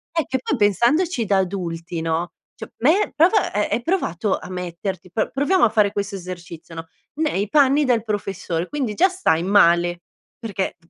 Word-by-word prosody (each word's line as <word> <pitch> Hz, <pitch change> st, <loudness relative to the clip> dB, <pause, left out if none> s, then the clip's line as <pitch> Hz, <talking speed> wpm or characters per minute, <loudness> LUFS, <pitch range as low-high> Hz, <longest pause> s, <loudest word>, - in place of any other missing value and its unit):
Eh, 325 Hz, -3 st, +1 dB
che 260 Hz, -, -1 dB
poi 290 Hz, -, -1 dB
pensandoci 235 Hz, -, +2 dB
da 200 Hz, -1 st, +2 dB
adulti 175 Hz, -3 st, -3 dB
no, 165 Hz, +1 st, -2 dB, 0.2 s
cioè -, -, -9 dB
me 320 Hz, -, +2 dB
prova, 355 Hz, +7 st, +3 dB
ehm, 210 Hz, +1 st, +1 dB
hai 240 Hz, -, 0 dB
provato 220 Hz, -, -1 dB
a -, -, -10 dB
metterti, 180 Hz, 0 st, -5 dB
pro 220 Hz, -, -1 dB
proviamo 300 Hz, +7 st, +2 dB
a 235 Hz, -, +6 dB
fare 210 Hz, -2 st, +2 dB
questo 200 Hz, 0 st, -3 dB
esercizio 175 Hz, -3 st, -9 dB
no, 165 Hz, 0 st, -7 dB, 0.3 s
nei 290 Hz, -10 st, -1 dB
panni 285 Hz, 0 st, +4 dB
del 235 Hz, -4 st, +2 dB
professore. 195 Hz, -5 st, -3 dB
Quindi 270 Hz, -7 st, -3 dB
già 370 Hz, -, +5 dB
stai 365 Hz, -, 0 dB
male, 175 Hz, -3 st, +3 dB, 0.4 s
perché 205 Hz, -5 st, -3 dB
205 Hz, 170 wpm, -21 LUFS, 175-275 Hz, 0.4 s, a